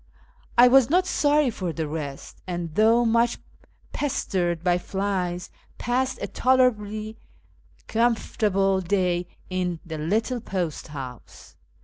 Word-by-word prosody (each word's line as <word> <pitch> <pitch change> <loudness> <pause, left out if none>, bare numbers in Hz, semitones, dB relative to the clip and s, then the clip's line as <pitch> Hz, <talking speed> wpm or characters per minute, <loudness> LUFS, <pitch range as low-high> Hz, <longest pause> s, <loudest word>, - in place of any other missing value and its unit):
I 245 +1 +9
was 260 0 +6
not 365 +4 +3
sorry 295 -6 +2
for 185 -5 -3
the 160 -1 -3
rest, 145 -3 -6
and, 175 -3 -4
though 225 +5 +4
much 235 +1 +2 0.6
pestered 175 - -1
by 180 -1 +2
flies, 185 -2 -2 0.3
passed 255 +2 -1
a - - -1
tolerably 220 -4 +1 0.7
comfortable 210 -4 +1
day 180 -1 0 0.2
in 180 -2 -1
the 160 -2 -6
little 225 +10 -1
post 180 -7 -3
house. 130 -5 -10
195 Hz, 115 wpm, -25 LUFS, 175-235 Hz, 0.7 s, I